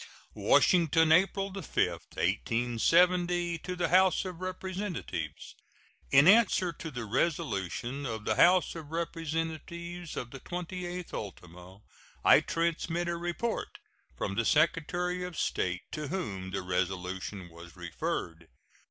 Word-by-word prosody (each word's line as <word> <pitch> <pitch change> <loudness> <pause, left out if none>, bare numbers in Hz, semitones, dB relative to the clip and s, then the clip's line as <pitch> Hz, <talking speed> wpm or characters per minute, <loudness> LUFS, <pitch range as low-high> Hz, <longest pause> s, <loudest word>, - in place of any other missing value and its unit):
WASHINGTON, 160 -2 +4
April 195 +3 +3
5, 195 - -5
1870. 175 +8 +1
To 180 +3 -5
the 175 - 0
House 185 +1 +4
of 180 -2 -7
Representatives: 185 - -5 0.6
In 140 +3 +6
answer 190 -4 +5
to 160 - -7
the 120 -5 -5
resolution 130 - -1
of 110 -2 -5
the - - +2
House 180 +1 +5
of 160 -3 -8
Representatives 165 +1 -4
of 120 - -5
the 135 - -8
28th 180 +2 -5
ultimo, 90 -1 -9 0.4
I - - +8
transmit 170 +1 -1
a 170 - -1
report 175 +7 -3 0.4
from 100 - -2
the 115 +4 0
Secretary 175 +6 +1
of 180 -2 -6
State, 90 0 -1
to 155 -2 -4
whom 100 - -4
the 95 0 -3
resolution 95 +1 -3
was 85 +1 -13
referred. 85 -1 -4
165 Hz, 120 wpm, -30 LUFS, -, 0.6 s, I